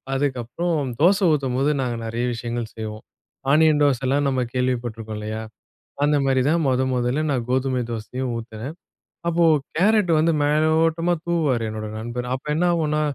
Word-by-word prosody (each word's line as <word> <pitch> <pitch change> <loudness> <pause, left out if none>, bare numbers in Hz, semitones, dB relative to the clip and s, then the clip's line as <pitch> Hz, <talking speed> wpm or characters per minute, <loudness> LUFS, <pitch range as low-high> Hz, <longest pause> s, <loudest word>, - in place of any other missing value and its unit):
அதுக்கப்புறம், 140 +3 -1
தோசை 195 +4 +4
ஊத்தும்போது 135 0 +1
நாங்க 125 -2 -1
நெறைய 115 +2 -2
விஷயங்கள் 115 -1 -4
செய்வோம். 110 -1 -6 0.5
ஆனியன் 155 0 +5
தோசைலாம் 135 +1 +2
நம்ம 130 -1 0
கேள்விப்பட்ருக்கோம் 120 -4 -2
இல்லையா. 110 +1 -4 0.7
அந்த 150 0 +3
மாரி 135 -1 +2
தான் 165 +1 +2
மொத 130 0 +2
மொதல்ல 125 +3 0
நான் 125 -3 -1
கோதுமை 130 -1 +1
தோசையும், 125 +3 -4
ஊத்துனேன். 115 +5 -7 0.5
அப்போ, 170 0 +2 0.3
கேரட் 205 0 +3
வந்து 165 +2 +3
மேலோட்டமா 160 +3 +2
தூவுவாரு 155 -9 +1
என்னோட 110 0 -5
நண்பர். 120 +2 -4
அப்ப 130 - -10
என்னாவும்ன்னா, 160 -3 +1
130 Hz, 135 wpm, -23 LUFS, 120-155 Hz, 0.7 s, ஆனியன்